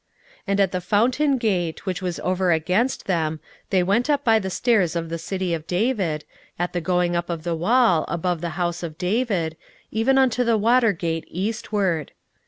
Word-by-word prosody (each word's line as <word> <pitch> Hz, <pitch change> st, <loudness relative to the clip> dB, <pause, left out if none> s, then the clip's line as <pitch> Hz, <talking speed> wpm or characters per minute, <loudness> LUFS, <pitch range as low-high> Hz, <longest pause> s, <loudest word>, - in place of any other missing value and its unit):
16:012:037 -, -, -31 dB
And 200 Hz, 0 st, +1 dB
at 195 Hz, -2 st, +3 dB
the 185 Hz, -, -2 dB
fountain 250 Hz, -, +2 dB
gate, 185 Hz, -9 st, -1 dB
which 185 Hz, 0 st, -2 dB
was 180 Hz, -2 st, -3 dB
over 185 Hz, 0 st, +1 dB
against 185 Hz, +10 st, +1 dB
them, 160 Hz, -4 st, -1 dB, 0.3 s
they 185 Hz, -2 st, +3 dB
went 210 Hz, +9 st, +1 dB
up 285 Hz, -1 st, +2 dB
by 225 Hz, -4 st, +4 dB
the 190 Hz, -2 st, -4 dB
stairs 195 Hz, -5 st, +1 dB
of 165 Hz, -1 st, -2 dB
the 165 Hz, 0 st, -4 dB
city 185 Hz, +1 st, -2 dB
of 160 Hz, -1 st, -4 dB
David, 180 Hz, -, 0 dB, 0.3 s
at 175 Hz, +1 st, -2 dB
the 175 Hz, -, -1 dB
going 180 Hz, 0 st, +1 dB
up 170 Hz, 0 st, -2 dB
of 165 Hz, -2 st, -4 dB
the 170 Hz, -1 st, -1 dB
wall, 180 Hz, -1 st, +3 dB
above 170 Hz, 0 st, -2 dB
the 170 Hz, -, -2 dB
house 175 Hz, -1 st, -1 dB
of 160 Hz, -3 st, -6 dB
David, 185 Hz, -4 st, 0 dB, 0.4 s
even 240 Hz, +5 st, +2 dB
unto 250 Hz, -2 st, +3 dB
the 230 Hz, -2 st, +2 dB
water 230 Hz, +1 st, +4 dB
gate 165 Hz, -3 st, -3 dB
eastward. 195 Hz, -4 st, -2 dB
185 Hz, 190 wpm, -23 LUFS, 170-225 Hz, 0.4 s, by